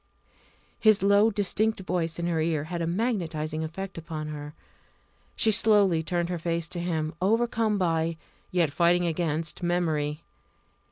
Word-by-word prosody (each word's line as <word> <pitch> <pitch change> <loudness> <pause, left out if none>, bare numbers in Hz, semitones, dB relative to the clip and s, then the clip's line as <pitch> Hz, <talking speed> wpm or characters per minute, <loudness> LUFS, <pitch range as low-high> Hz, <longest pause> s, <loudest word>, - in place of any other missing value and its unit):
His 215 -3 +4
low 200 +2 +5
distinct 215 +1 0
voice 170 -3 -2
in 170 - -2
her 165 -2 0
ear 155 -2 0
had 170 +2 -4
a 165 - -1
magnetising 165 -6 -2
effect 185 +3 -6
upon 155 -2 -6
her. 150 0 -7 0.8
She 220 - +3
slowly 205 -6 +4
turned 170 +1 -1
her 175 -1 -2
face 170 0 -2
to 175 - -4
him, 160 -2 -2
overcome 225 +1 +1
by 165 -3 0 0.3
yet 170 -5 +1
fighting 175 +3 +3
against 160 -2 -2
memory. 160 -3 -1
170 Hz, 145 wpm, -27 LUFS, 160-195 Hz, 0.8 s, low